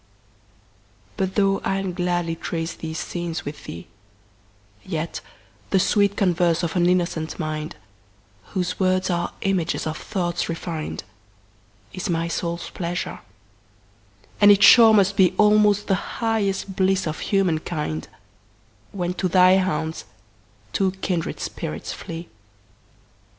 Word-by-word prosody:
But 190 - -2
though 195 -1 +3
I'll 195 -1 -1
gladly 175 -2 -1
trace 165 0 -4
these 160 0 -6
scenes 170 -2 -4
with 145 +1 -7
thee, 85 - -8 1.0
Yet 160 +1 -4 0.5
the 195 - +3
sweet 200 +1 +2
converse 175 -2 +2
of 165 0 -2
an 175 -1 +3
innocent 170 -3 0
mind, 155 0 -4 0.8
Whose 180 -1 -1
words 185 0 +2
are 175 0 -1
images 190 -4 0
of 155 0 -2
thoughts 175 -4 -2
refin'd, 165 -2 -4 0.9
Is 185 +2 -4
my 165 -1 0
soul's 170 0 -3
pleasure; 175 0 -4 1.2
and 205 - +8
it 200 -1 +6
sure 230 -2 +9
must 200 -2 +3
beAlmost 210 +2 +4
the - - +1 0.2
highest 200 -4 -1
bliss 190 0 +2
of 155 -1 -3
human 190 -6 +1
kind, 150 - -4 0.8
When 180 -2 -2
to 185 - -1
thy 185 +1 +6
haunts 160 -4 -2 0.7
two 190 -2 +1
kindred 175 -3 -2
spirits 75 +1 -5
flee. 165 +1 -7
180 Hz, 120 wpm, -23 LUFS, 165-195 Hz, 1.2 s, sure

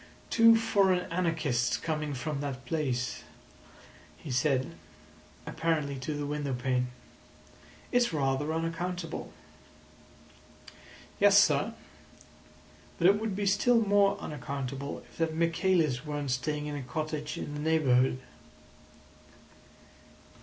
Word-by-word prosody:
"Two 230 0 +7
foreign 195 -5 +2
anarchists 160 -8 0
coming 155 -3 -3
from 140 +2 -3
that 135 -2 -5
place," 130 -6 -2 1.0
he 150 - -8
said, 130 +1 +1 0.7
apparently 155 -4 -1
to 150 +3 -4
the 145 0 -3
window 145 -2 -2
pane. 125 0 0 1.0
"It's 245 -3 +3
rather 140 0 0
unaccountable."' 165 +1 -3 1.9
"Yes, 200 0 +6
sir. 205 +3 +3 1.2
But 170 - 0
it 200 +1 +3
would 220 -3 -2
be 205 0 -2
still 205 +5 +4
more 200 -2 +3
unaccountable 140 -2 -5
if - - -20
that 165 -1 0
Michaelis 165 -5 +1
weren't 145 -3 -3
staying 150 +4 -2
in 150 0 -4
a 145 - -4
cottage 150 +3 -4
in 145 - -5
the 145 - -5
neighbourhood." 135 -5 +3
155 Hz, 110 wpm, -29 LUFS, 140-180 Hz, 1.9 s, Two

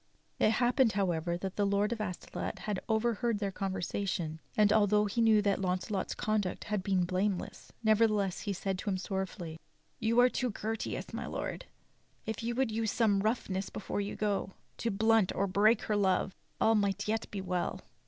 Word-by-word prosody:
It 215 - +4
happened, 245 0 +3
however, 175 -3 0
that 190 +1 -5
the 205 - +2
Lord 200 +2 +2
of 230 -2 -2
Astolat 185 -4 -4
had 210 -3 -3
overheard 230 0 +1
their 200 -1 -2
conversation; 190 -4 -2 0.2
and 210 -1 +5
although 210 -1 +4
he 210 +3 0
knew 220 -2 +5
that 200 -1 +1
Launcelot's 185 +1 -1
conduct 215 -4 -1
had 210 -2 -1
been 190 -1 +1
blameless, 185 +1 -2
nevertheless 215 -3 +3
he 205 - -3
said 190 0 -2
to 205 - -3
him 190 - 0
sorrowfully: 185 -4 -4 0.4
"You 230 +1 +2
are 245 - +8
too 255 0 -1
courteous, 220 +1 -4
my - - -4
Lord; - - -4 0.6
if 220 +1 -3
you 235 +1 -2
would 260 -2 +1
use 220 -1 0
some 215 -4 +3
rough 220 +4 0
ness 190 0 -2
before 205 - -3
you 200 - -4
go, 200 -2 -1 0.2
to 235 - -1
blunt 220 -1 +3
or 200 - +1
break 205 +4 +3
her 215 - 0
love, 190 -1 +2 0.3
all 225 - +4
might 205 -1 +1
yet 220 +1 -1
be 200 - -5
well." 180 -2 -2
205 Hz, 185 wpm, -31 LUFS, 190-220 Hz, 0.6 s, are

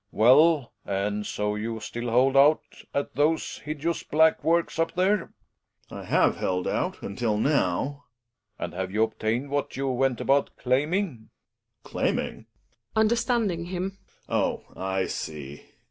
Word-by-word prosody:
Well, 140 +5 +5
and 105 +2 -2
so 105 0 -1
you 110 +2 -3
still 120 +2 -5
h - - -4
old 130 +2 +4
out 145 +3 +6 0.3
at 140 - -2
those 155 +2 0
hideous 155 +3 -3
black 160 +1 +3
Works 170 0 +1
up 165 - +1
the 180 - +2
re? 205 +3 +4
Gregers. 180 - -10 0.6
I - - -7
have - - +3
held 90 -1 -1
out - - -2
until 105 +1 -1
now. 140 +2 0 0.5
Relling. - - -2
And - - -8
have 95 +1 -3
you 110 +2 +2
obtained 115 +4 -2
what 145 -2 -2
you 135 0 -1
went 130 -1 +1
about 140 +1 +1
claiming? 140 - 0 0.5
Gregers. - - -15 0.2
Claiming? - - -4 0.5
{Understanding 220 -5 +1
him.) 190 +2 -4 0.3
Oh! - - 0
I 95 0 -1
see. 75 -2 -6
135 Hz, 150 wpm, -26 LUFS, 110-165 Hz, 0.6 s, out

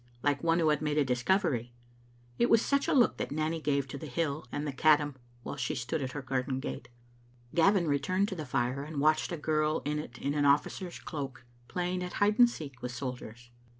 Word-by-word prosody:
like 145 +1 +1
one 165 0 +3
who 165 -2 +3
had 150 -1 +2
made 150 -1 0
a 150 - +4
discovery. 125 - 0 0.6
It 240 - +3
was 230 0 +5
such 280 0 +1
a - - +2
look 250 -4 +4
that - - -3
Nanny 155 +2 -1
gave 140 -2 0
to 140 - -6
the 155 - -7
hill 145 -1 -2
and 145 - -3
Caddam 150 -1 +4 0.3
while - - -5
she 125 -3 -2
stood 130 +6 -2
at 130 -2 -4
her 145 - -5
garden 130 0 -1
gate. 135 - -6 0.6
Gavin 185 +1 +4
returned 185 +8 +1
to 190 - -4
the 155 - -4
fire 125 +1 0
and 150 0 -5
watched 155 +3 +2
a 170 - -2
girl 155 0 0
in 150 +1 -1
it 120 -6 -8
in 140 - -2
an 145 -1 +1
officer's 145 +5 +1
cloak 135 -6 -6 0.2
playing 180 0 -2
at 180 - -5
hide 210 +2 +2
and 240 -1 +8
seek 140 - -8
with 125 - -4
sol 125 +1 -3
diers. 120 +1 -12
150 Hz, 220 wpm, -30 LUFS, 135-165 Hz, 0.6 s, and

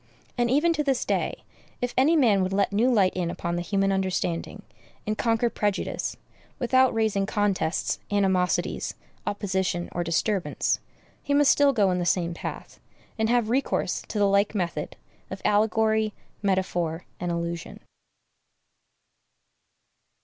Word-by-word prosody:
And 240 -1 +1
even 300 +6 +3
to 300 - 0
this 270 -3 0
day, - - -1 0.4
if 245 0 -2
any 290 +6 +4
man 225 -10 +4
would 185 +1 -1
let 200 0 +1
new 235 +5 +3
light 200 -6 +3
in 180 -2 -1
upon 170 0 -3
the 175 - -1
human 195 +2 +1
understanding, 190 0 -2 0.4
and 215 - -1
conquer 230 +1 +1
prejudice, 205 -3 -2 0.4
without 260 0 +3
raising 215 -3 0
contests, 200 -5 0
animosities, 190 -3 0 0.3
opposition, 190 -3 -1
or 175 - -2
disturbance, 180 +3 0 0.4
he 285 - 0
must 290 -1 +6
still 285 -1 +4
go 205 -7 +2
in 180 - 0
the 175 - -1
same 170 -1 +1
path, - - -7 0.4
and 220 0 +2
have 235 -2 +2
recourse 270 +3 0
to - - -5
the 205 - +4
like 200 +2 +2
method 170 -6 -2 0.3
of 190 - -6
allegory, 220 0 +2 0.3
metaphor, 180 -4 -1
and 175 -1 -2
allusion. 170 0 -4
200 Hz, 140 wpm, -26 LUFS, 180-230 Hz, 0.4 s, must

